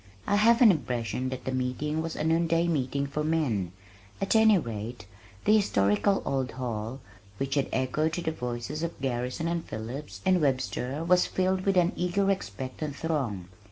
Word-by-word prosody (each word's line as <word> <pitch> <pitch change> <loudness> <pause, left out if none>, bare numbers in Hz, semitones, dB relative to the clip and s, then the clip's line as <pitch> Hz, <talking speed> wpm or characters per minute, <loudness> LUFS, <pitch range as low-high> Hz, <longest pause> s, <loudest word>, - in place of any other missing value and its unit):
I 205 - +2
have 230 +3 +5
an 220 - +9
impression 125 - -2
that 130 -1 -6
the 130 - -1
meeting 130 +5 -1
was 165 0 -4
a - - -2
noon 165 +1 +2
day 165 +1 +2
meeting 140 -3 0
for 145 +2 -3
men, 135 - 0 0.5
at 195 +2 +1
any 220 -2 +6
rate 115 - -5 0.4
the 215 - +6
historical 105 - +2
old 130 -3 -1
hall, 120 0 -4 0.4
which 135 +3 -2
had 140 -2 +1
echoed 150 +5 0
to 175 - -2
the 160 - 0
voices 125 +2 -4
of 170 0 -4
Garrison 130 +4 -2
and 170 -1 -1
Phillips 120 +7 -6
and 185 -2 +4
Webster 135 +1 -1
was 180 +1 +4
filled 185 0 0
with 195 -1 +3
an 175 -1 +4
eager 195 +3 +1
expectant 135 - -4
throng. 135 - -2
145 Hz, 175 wpm, -28 LUFS, 125-170 Hz, 0.5 s, an